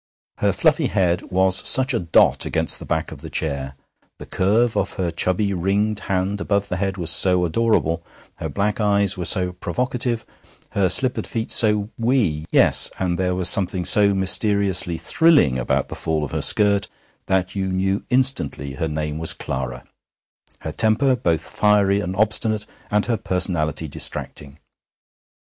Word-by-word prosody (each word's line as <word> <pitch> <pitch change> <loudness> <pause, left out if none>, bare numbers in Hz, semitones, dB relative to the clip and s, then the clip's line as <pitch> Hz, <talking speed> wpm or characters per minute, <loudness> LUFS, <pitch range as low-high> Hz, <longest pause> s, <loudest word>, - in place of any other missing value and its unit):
Her - - +1
fluffy - - +1
head 90 -2 -1
was 95 0 +2
such 130 +1 +2
a 115 - -1
dot 85 -4 +2
against - - -1
the - - -11
back - - -3
of - - -11
the - - -9
chair, 70 -3 -4 0.4
the - - -11
curve 110 +5 0
of - - -2
her 90 -3 -3
chubby 95 +4 -1
ringed 100 +4 -1
hand 95 +1 -2
above 100 -1 -2
the 90 - -3
head 95 +1 -3
was 85 -3 0
so 90 0 +3
adorable, 85 -3 -1 0.4
her - - -6
black 105 +2 -3
eyes 100 -2 +2
were 90 -2 -5
so 90 -1 +3
provocative, 120 +5 -3 0.5
her 95 -2 0
slippered 130 +5 +1
feet 115 -1 -5
so 105 -1 +3
wee 110 - -1
yes, - - +5
and 90 -2 -3
there 90 -1 -1
was 90 -1 +3
something 90 -2 +5
so 100 +2 +6
mysteriously 95 -2 +1
thrilling 150 - +2
about - - -2
the - - -7
fall 80 -1 -2
of 75 - -6
her - - -3
skirt 100 -1 +3 0.4
that 95 0 -1
you 95 -1 -3
knew 95 +1 -2
instantly 125 - 0
her 80 +5 -4
name 75 0 -5
was 80 - +2
Clara, 65 -3 -6 0.8
her - - -6
temper 125 +5 +1
both 85 -9 -1
fiery 100 -1 +1
and 95 -2 -5
obstinate, 110 +1 0 0.2
and 105 0 0
her 115 -2 -1
personality 90 -6 -1
distracting. 70 0 -4
95 Hz, 165 wpm, -20 LUFS, 85-105 Hz, 0.8 s, so